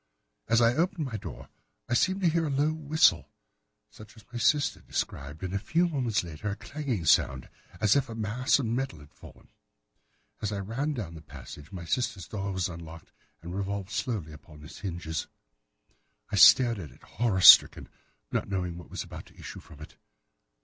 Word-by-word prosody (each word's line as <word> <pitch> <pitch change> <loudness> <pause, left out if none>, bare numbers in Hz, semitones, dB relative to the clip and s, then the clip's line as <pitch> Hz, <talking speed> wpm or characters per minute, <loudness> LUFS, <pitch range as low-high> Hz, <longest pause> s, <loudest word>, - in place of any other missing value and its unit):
As 115 +1 +3
I 115 +1 +4
opened 170 +2 0
my 125 -5 -5
door 105 - -8 0.4
I - - -2
seemed 190 +10 +2
to 180 - +3
hear 165 0 +1
a - - -2
low 145 +3 +1
whistle, 155 0 +2 0.6
such 110 +1 -15
as 110 - -16
my 120 - -4
sister 145 +1 +2
described, 75 +4 -5
and 95 0 -4
a 100 - 0
few 170 - +1
moments 125 - -1
later 85 +5 -6
a 100 - -3
clanging 130 - -4
sound, 65 -3 +3 0.3
as 105 +2 +3
if 135 -3 +1
a 115 - -6
mass 115 +4 +1
of 135 - -2
metal 120 -4 -2
had 75 0 -16
fallen. - - -16 0.9
As 105 -1 -2
I 100 - -3
ran 115 +10 -3
down 100 -9 -5
the 80 - -10
passage, 75 0 -12
my 90 -4 -7
sister's 100 -2 -2
door 100 -2 -4
was 95 -2 -1
unlocked, 80 -2 -10 0.3
and 85 +1 -7
revolved 100 0 -4
slowly 105 -10 -3
upon 75 0 -14
its 75 - -11
hinges. 85 -5 -4 1.0
I - - -1
stared 120 -4 +7
at 80 -6 -8
it - - -20
horror 110 -6 -1
stricken, - - +8 0.4
not - - -2
knowing 90 -3 -3
what 85 - -13
was - - -5
about - - -10
to - - -21
issue - - -9
from 75 0 -16
it. 75 - -12
105 Hz, 190 wpm, -28 LUFS, 85-130 Hz, 1.0 s, stricken